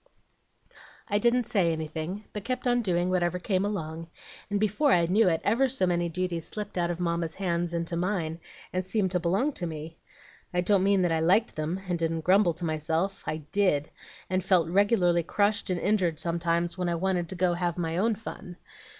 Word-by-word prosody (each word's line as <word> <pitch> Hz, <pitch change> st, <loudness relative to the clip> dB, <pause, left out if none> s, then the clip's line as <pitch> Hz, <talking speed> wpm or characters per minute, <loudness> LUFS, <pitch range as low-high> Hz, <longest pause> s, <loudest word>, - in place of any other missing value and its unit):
"I 205 Hz, 0 st, +2 dB
didn't 240 Hz, +3 st, +3 dB
say 195 Hz, -7 st, +1 dB
anything, 160 Hz, +5 st, -4 dB
but 210 Hz, -, -4 dB
I -, -, -24 dB
kept 255 Hz, +1 st, -3 dB
on 245 Hz, -1 st, +3 dB
doing 180 Hz, -3 st, 0 dB
whatever 180 Hz, -1 st, +1 dB
came 185 Hz, +1 st, 0 dB
along, 165 Hz, -5 st, -4 dB, 0.4 s
and 205 Hz, 0 st, 0 dB
before 215 Hz, +8 st, +2 dB
I 170 Hz, -5 st, +4 dB
knew 190 Hz, +3 st, +4 dB
it 165 Hz, -2 st, 0 dB
ever 250 Hz, +6 st, +2 dB
so 250 Hz, -7 st, +1 dB
many 175 Hz, -1 st, 0 dB
duties 170 Hz, -1 st, -3 dB
slipped 210 Hz, -1 st, -6 dB
out 175 Hz, -1 st, 0 dB
of 175 Hz, 0 st, -3 dB
Mamma's 170 Hz, -2 st, -1 dB
hands 175 Hz, -3 st, -1 dB
into 170 Hz, 0 st, -2 dB
mine, 170 Hz, -3 st, -1 dB, 0.3 s
and 185 Hz, +1 st, 0 dB
seemed 190 Hz, 0 st, 0 dB
to 180 Hz, -, +1 dB
belong 195 Hz, -, +1 dB
to 175 Hz, -, -4 dB
me. 160 Hz, +1 st, -7 dB, 0.6 s
I 180 Hz, -, +3 dB
don't 195 Hz, +1 st, +3 dB
mean 195 Hz, -1 st, +3 dB
that 175 Hz, -, +1 dB
I 160 Hz, -, +2 dB
liked 190 Hz, +8 st, +3 dB
them, 160 Hz, +5 st, -3 dB
and 175 Hz, -2 st, -1 dB
didn't 165 Hz, 0 st, -1 dB
grumble 185 Hz, +1 st, +4 dB
to 175 Hz, +1 st, -5 dB
myself; 160 Hz, +4 st, -1 dB
I 155 Hz, 0 st, -3 dB
did, 180 Hz, -8 st, +1 dB, 0.4 s
and 185 Hz, 0 st, 0 dB
felt 175 Hz, -3 st, +3 dB
regularly 185 Hz, -2 st, +3 dB
crushed 205 Hz, +5 st, 0 dB
and 180 Hz, -2 st, 0 dB
injured 180 Hz, -7 st, +1 dB
sometimes 170 Hz, +1 st, -1 dB
when 180 Hz, -1 st, 0 dB
I 170 Hz, -, 0 dB
wanted 175 Hz, -1 st, -1 dB
to -, -, -5 dB
go 180 Hz, 0 st, +2 dB
and 175 Hz, -, -3 dB
have 175 Hz, -1 st, -1 dB
my 165 Hz, -2 st, -2 dB
own 225 Hz, +2 st, +2 dB
fun. 195 Hz, -4 st, -9 dB
180 Hz, 205 wpm, -28 LUFS, 170-200 Hz, 0.6 s, I